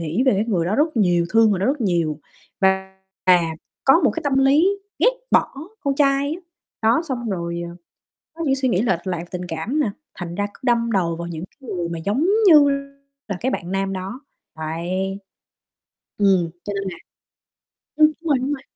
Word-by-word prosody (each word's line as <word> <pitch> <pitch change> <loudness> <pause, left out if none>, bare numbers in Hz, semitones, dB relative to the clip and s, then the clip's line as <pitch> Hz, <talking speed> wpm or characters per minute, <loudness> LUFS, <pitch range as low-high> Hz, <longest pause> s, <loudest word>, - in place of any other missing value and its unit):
nghĩ 165 +8 -1
về 260 - +6
cái 200 +1 +1
người 190 -8 0
đó 195 - 0
rất 305 0 +1
nhiều, 175 -5 +3
thương 225 -1 +5
người 200 - +1
đó 195 - +1
rất 280 +1 0
nhiều 170 -8 0 0.4
và 190 0 +1 0.3
và 180 -1 +7 0.4
có 270 +5 +6
một 270 - +5
cái - - -4
tâm 275 -2 +2
lý 280 +6 +5 0.3
ghét - - +5 0.2
bỏ - - +3 0.3
con 280 -5 0
trai 280 +1 +2
á, 360 - -9 0.5
đó. 235 +8 +3
Xong 240 -4 -3
rồi, 170 -2 -3
ờ, 175 - -11 0.6
có 330 +1 -5
những 270 - +2
suy 265 -1 0
nghĩ 195 -3 +2
lệch 190 -6 0
lạc 175 -2 -2
tình 180 -1 -4
cảm 175 - -2
nè, 295 - +2 0.3
thành 175 -1 -6
ra 205 +1 -1
cứ - - -18
đâm 235 -2 +2
đầu 175 -5 +1
vào 170 +1 -6
những 165 -1 -6
cái 265 +5 -15
người 175 -2 -2
mà 170 -1 -4
giống 210 - 0 0.2
như 300 -5 +8 0.6
là 200 -4 -3
cái 260 +6 -1
bạn 175 -6 -4
nam 195 0 -1
đó. 190 +6 -5 0.4
Đấy, 175 +5 -3 1.0
ừm, 190 -4 +3
cho 205 - -4
nên 195 - -2
là 175 - -8 1.0
ưm, 305 0 +7
đúng 335 - -5
rồi, 280 - +4
đúng 265 +3 -2
rồi. 265 - -9
200 Hz, 205 wpm, -22 LUFS, 175-270 Hz, 1.0 s, như